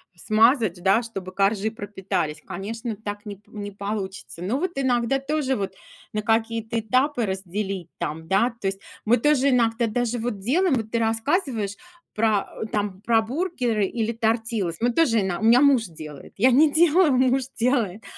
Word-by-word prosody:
смазать, 215 - +2
да, 195 +5 +4
чтобы 195 -6 -7
коржи 200 +2 +1
пропитались, 190 -7 -3
конечно, 220 +4 -5
так 205 0 -6
не 205 -2 -7
п 205 - -31
не 205 -1 -6
получится. 200 -3 -5
Но 205 +9 -1
вот 370 +1 -1
иногда 260 -1 +1
тоже 275 -1 -1
вот 195 -3 -3 0.4
на 215 - -2
какие-то 225 +1 0
этапы 255 +3 +1
разделить 190 -1 -4
там, 160 -1 -4
да, 225 +7 +2
то 195 - -2
есть. 195 0 -2 0.3
Мы 235 +3 +4
тоже 280 +1 +3
иногда 235 -2 +2
даже 245 +2 -1
вот 225 -3 -3
делаем, 300 - +2
вот 220 -3 -3
ты 230 - +1
рассказываешь 225 - 0 0.4
про 215 -2 +2
а, 220 - -7
там 205 -3 -3
про 225 0 +3
бургеры 245 - -1
или 225 +2 -2
тортилас, 225 -5 -1
мы 245 - +2
тоже, 235 -5 +3
ин 190 -2 -1
у - - -6
меня 235 +3 +6
муж 275 -5 +4
делает, 155 -4 -10
я 250 +5 +5
не 295 +5 +5
делаю, 330 0 +4
муж 260 +1 +3
делает. 230 -5 0
225 Hz, 170 wpm, -24 LUFS, 200-250 Hz, 0.4 s, меня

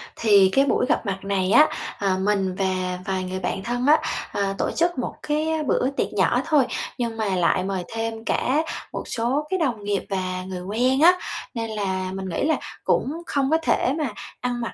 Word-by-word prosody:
Thì 200 -4 +5
cái 275 +1 +5
buổi 265 - +2
gặp 310 - +1
mặt 195 -1 -1
này 195 -1 0
á, 300 +6 +7 0.3
ờ, 195 -2 +1
mình 195 -2 +1
và 185 -1 -1
vài 190 -1 -1
người 185 +1 -4
bạn 190 +1 -3
thân 245 +2 -1
á, 310 - +7 0.3
ờ, 200 -1 -1
tổ - - 0
chức 345 0 +1
một 250 - -3
cái 305 +1 0 0.2
bữa 255 - +2
tiệc - - -1
nhỏ - - +2
thôi. 305 -4 +4 0.3
Nhưng 230 -2 -2
mà 220 - -1
lại 180 +1 +2
mời 190 -1 -2
thêm 225 0 -4
cả 285 +7 +1 0.3
một - - -3
số 260 +6 -1
cái 375 -1 0
đồng 240 -9 -1
nghiệp 200 -2 -1
và 185 -1 -2
người 185 -1 -6
quen 245 +8 +1
á, 360 +2 +7 0.4
nên 230 -1 -3
là 190 -3 -2
mình 190 -1 -4
nghĩ 170 - -2
là 315 - +3 0.3
cũng 275 - +1
không 275 -4 0
có 320 - +5
thể 265 -4 +2
mà 300 -6 -1 0.3
ăn 245 -1 -2
mặc 230 - -4
220 Hz, 210 wpm, -24 LUFS, 190-265 Hz, 0.4 s, á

